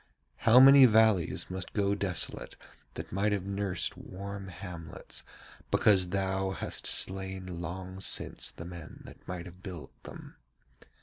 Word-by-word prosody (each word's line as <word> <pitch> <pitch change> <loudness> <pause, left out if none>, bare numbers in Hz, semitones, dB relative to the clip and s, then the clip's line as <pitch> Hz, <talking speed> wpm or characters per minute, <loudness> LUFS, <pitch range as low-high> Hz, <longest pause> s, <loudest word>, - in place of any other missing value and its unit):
How 115 +3 +8
many 135 0 +9
valleys 110 -6 +3
must 95 0 -5
go 100 -1 +1
desolate 95 -4 -2 0.4
that - - -7
might 100 +3 0
have 100 -2 -1
nursed 100 -1 -2
warm 100 +1 -8
hamlets, 85 -3 -9 0.5
because 95 -4 +3
thou 95 0 -1
hast 95 - -3
slain 95 -2 0
long 95 +2 -6
since - - -1
the - - -10
men 85 -2 -10
that - - -15
might 90 -1 -5
have 90 0 -13
built 90 -5 -8
them? - - -12
95 Hz, 135 wpm, -30 LUFS, 90-100 Hz, 0.5 s, many